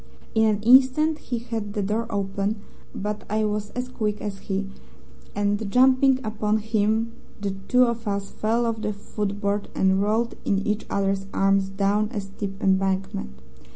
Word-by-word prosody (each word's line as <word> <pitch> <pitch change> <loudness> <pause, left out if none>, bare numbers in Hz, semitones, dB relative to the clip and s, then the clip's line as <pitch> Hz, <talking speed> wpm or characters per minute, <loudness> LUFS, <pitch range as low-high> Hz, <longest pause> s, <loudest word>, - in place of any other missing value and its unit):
In 220 0 +4
an 210 -1 +1
instant 265 +6 +5
he 245 - -4
had 225 -3 -4
the 205 - -1
door 215 +4 -1
open, 200 0 -1 0.4
but 210 +2 -3
I 215 +1 +1
was 210 0 -2
as 250 0 -2
quick 215 -4 -2
as 200 -2 -5
he, 195 0 -3 0.7
and 205 +1 0
jumping 260 +1 +5
upon 215 -1 0
him 220 +1 0 0.3
the 200 -1 -2 0.2
two 250 0 +5
of 235 -2 -1
us 200 -1 -2
fell 230 +2 0
off 225 -1 -2
the 210 - -1
footboard 205 0 -3
and 190 0 +3
rolled 220 +3 +1
in 195 0 0
each 210 0 -1
other's 195 -1 0
arms 195 0 +3
down 200 +2 +1
a 215 - -1
steep 195 0 -6
embankment. 190 - 0
210 Hz, 160 wpm, -24 LUFS, 195-225 Hz, 0.7 s, instant